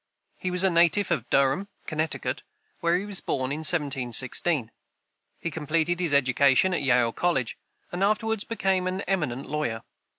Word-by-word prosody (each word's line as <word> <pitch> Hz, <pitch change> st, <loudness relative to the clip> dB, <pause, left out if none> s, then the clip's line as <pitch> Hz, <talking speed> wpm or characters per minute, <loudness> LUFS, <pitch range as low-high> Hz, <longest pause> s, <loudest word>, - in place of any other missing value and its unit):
He 185 Hz, -, -2 dB
was 180 Hz, +1 st, +1 dB
a 190 Hz, -, +3 dB
native 175 Hz, +3 st, +3 dB
of 125 Hz, -9 st, -1 dB
Durham, 140 Hz, +8 st, +2 dB, 0.2 s
Connecticut, 155 Hz, 0 st, -2 dB, 0.4 s
where 170 Hz, +1 st, +2 dB
he 195 Hz, -, -4 dB
was 205 Hz, -2 st, -1 dB
born 130 Hz, -1 st, -2 dB
in 150 Hz, -, -3 dB
1716. 135 Hz, -3 st, +1 dB, 0.7 s
He 170 Hz, -, -4 dB
completed 160 Hz, +3 st, -1 dB
his 175 Hz, -4 st, 0 dB
education 140 Hz, +5 st, +3 dB
at 170 Hz, -, 0 dB
Yale 125 Hz, -4 st, +3 dB
college, 150 Hz, -5 st, -1 dB, 0.4 s
and 175 Hz, +2 st, -2 dB
afterward 215 Hz, +1 st, 0 dB
became 190 Hz, -5 st, 0 dB
an 185 Hz, +1 st, -2 dB
eminent 150 Hz, -11 st, -2 dB
lawyer. 140 Hz, -7 st, -3 dB
160 Hz, 155 wpm, -26 LUFS, 135-185 Hz, 0.7 s, a